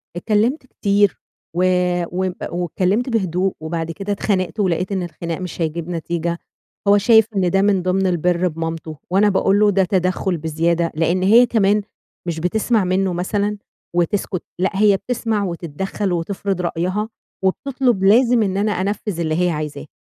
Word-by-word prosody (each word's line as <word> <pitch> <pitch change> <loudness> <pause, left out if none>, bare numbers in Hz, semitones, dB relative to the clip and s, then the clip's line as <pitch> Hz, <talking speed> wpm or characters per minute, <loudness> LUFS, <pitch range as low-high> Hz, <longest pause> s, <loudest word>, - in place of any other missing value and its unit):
اتكلمت 225 - 0
كتير 200 -5 +1 0.4
و 180 - +2 0.5
وب 185 +1 -1 0.2
واتكلمت 185 - 0
بهدوء، 190 -4 0
وبعد 165 +1 -3
كده 195 +4 -5
اتخانقت 185 -2 -1
ولقيت 185 0 0
إن 190 -2 -1
الخناق 170 0 -5
مش 180 -2 -6
هيجيب 165 +2 -2
نتيجة، 170 0 -2 0.5
هو 205 - +6
شايف 220 +1 +5
إن 185 -2 +2
ده 195 +1 +3
من 200 -2 +2
ضمن 185 +1 +1
البِرّ 180 0 +1
بمامتُه، 165 -1 -5
وأنا 205 +2 +4
باقول 195 +1 +2
له 210 -1 +5
ده 195 0 +3
تَدَخُّل 185 -1 0
بزيادة، 165 +2 0
لإن 170 +3 +1
هي 225 +6 +7
كمان 210 -3 +2 0.5
مش 165 -1 -2
بتِسمَع 215 +4 +1
منه 185 0 +1
مثلًا 205 +4 -1 0.4
وتسكت، 180 +1 0 0.2
لأ، 190 - +3
هي 205 0 +4
بتِسمَع 225 -2 -2
وتتدخّل 180 +3 -3
وتِفرِض 185 +2 -2
رأيها، 185 +5 -2 0.3
وبتطلب 245 +1 0
لازم 235 +3 +5
إن 195 -1 -1
أنا 210 +1 +1
أنفِّذ 200 -1 -2
اللي 160 0 0
هي 180 - +2
عايزاه. 150 -2 -4
185 Hz, 155 wpm, -20 LUFS, 170-205 Hz, 0.5 s, هي